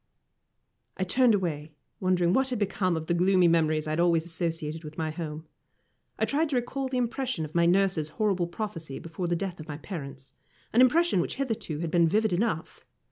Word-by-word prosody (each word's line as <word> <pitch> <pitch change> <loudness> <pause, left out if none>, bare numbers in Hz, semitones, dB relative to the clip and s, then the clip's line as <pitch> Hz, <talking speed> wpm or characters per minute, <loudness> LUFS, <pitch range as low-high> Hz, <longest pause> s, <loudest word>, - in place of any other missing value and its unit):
I 190 - 0
turned 235 +4 +4
away, 160 -5 -3 0.3
wondering 180 -2 +2
what 265 +3 +2
had 250 - -2
become 185 -4 0
of 160 - -4
the 170 - 0
gloomy 180 +1 +4
memories 155 -2 +2
I 155 - -3
had 155 - -1
always 170 -2 +3
associated 165 -2 -3
with 150 0 -9
my 160 -1 -1
home. 155 -1 -6 0.7
I - - +2
tried 305 +2 0
to 280 - -1
recall 260 +2 -1
the 260 -1 -2
impression 250 - -1
of 155 - -11
my 170 0 +3
nurse's 180 -4 +2
horrible 195 -5 +1
prophecy 170 -6 -5
before 165 +2 -5
the 175 - +1
death 180 0 -4
of 155 - -9
my 145 -2 -5
parents 140 -6 -8 0.4
an 240 - +6
impression 315 - +4
which - - -3
hitherto 225 - -3
had 165 -2 -3
been 170 -1 +4
vivid 215 +3 +2
enough. 180 -3 -2
175 Hz, 195 wpm, -28 LUFS, 160-215 Hz, 0.7 s, an